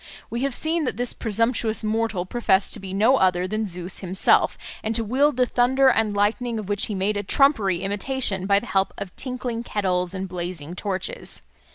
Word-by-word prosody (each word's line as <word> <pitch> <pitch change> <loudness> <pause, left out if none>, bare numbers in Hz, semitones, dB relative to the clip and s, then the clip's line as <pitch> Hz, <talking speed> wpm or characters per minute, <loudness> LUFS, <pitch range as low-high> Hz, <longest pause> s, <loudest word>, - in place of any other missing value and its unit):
We 235 - -3
have 275 -2 0
seen 320 0 0
that - - -3
this 245 0 +2
presumptuous 225 0 0
mortal 215 -4 -1
professed 195 -2 +1
to - - -2
be 190 -1 -8
no 220 +7 +3
other 185 -2 +2
than 215 +2 -2
Zeus 180 0 -3
himself, 185 0 +2 0.3
and 220 +1 -2
to 230 - +2
wield 265 +5 +1
the 250 - +4
thunder 260 +2 +3
and 220 -4 +1
lightning, 225 +3 0
of 215 -3 -5
which 205 0 +1
he 210 - -4
made 200 +2 0
a 205 - -2
trumpery 205 - +2
imitation 200 -1 0
by 200 0 +4
the 240 - -10
help 195 -4 0
of 195 -3 -7
tinkling 250 -3 -4
kettles 185 -5 -1
and 190 0 -4
blazing 175 -3 -5
torches. 200 - -4
215 Hz, 195 wpm, -23 LUFS, 190-245 Hz, 0.3 s, the